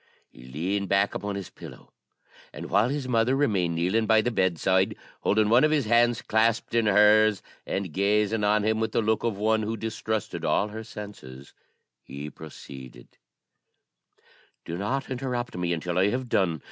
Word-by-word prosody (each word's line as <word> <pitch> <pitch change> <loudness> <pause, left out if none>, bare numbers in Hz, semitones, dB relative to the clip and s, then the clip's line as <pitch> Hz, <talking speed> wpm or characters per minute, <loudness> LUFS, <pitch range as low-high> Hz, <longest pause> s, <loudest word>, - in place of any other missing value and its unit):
He 60 - -15
leaned 95 +9 -3
back 100 +1 +2
upon 100 -1 -4
his 100 -2 -7
pillow, - - -13 0.6
and - - -9
while 105 +5 +3
his 140 -1 -3
mother 120 +1 +2
remained 100 - +1
kneeling 95 +7 0
by 110 0 +5
the 120 - -1
bedside, 95 -1 +1 0.2
holding 105 +1 +2
one 120 +3 +5
of 155 - +4
his 150 -4 +1
hands 120 +1 +2
clasped 110 +1 +1
in 115 -2 +2
hers, 105 0 +4 0.2
and 95 -5 -3
gazing 105 +3 +1
on 105 0 +2
him 110 +1 +1
with 110 -1 -2
the - - +2
look 110 0 0
of 115 -4 -1
one 110 +1 +1
who 110 +1 -3
distrusted 110 -1 -4
all 105 - +1
her 110 +1 -7
senses, 70 -12 -10 0.5
he 70 +3 -8
proceeded: 65 -5 -12 1.5
"Do 85 - -5
not 130 +10 -3
interrupt 125 -1 -3
me 90 -1 -2
until 85 +1 -1
I 95 +2 +3
have 125 +2 -3
done. 85 -8 +1
105 Hz, 170 wpm, -26 LUFS, 95-115 Hz, 1.5 s, by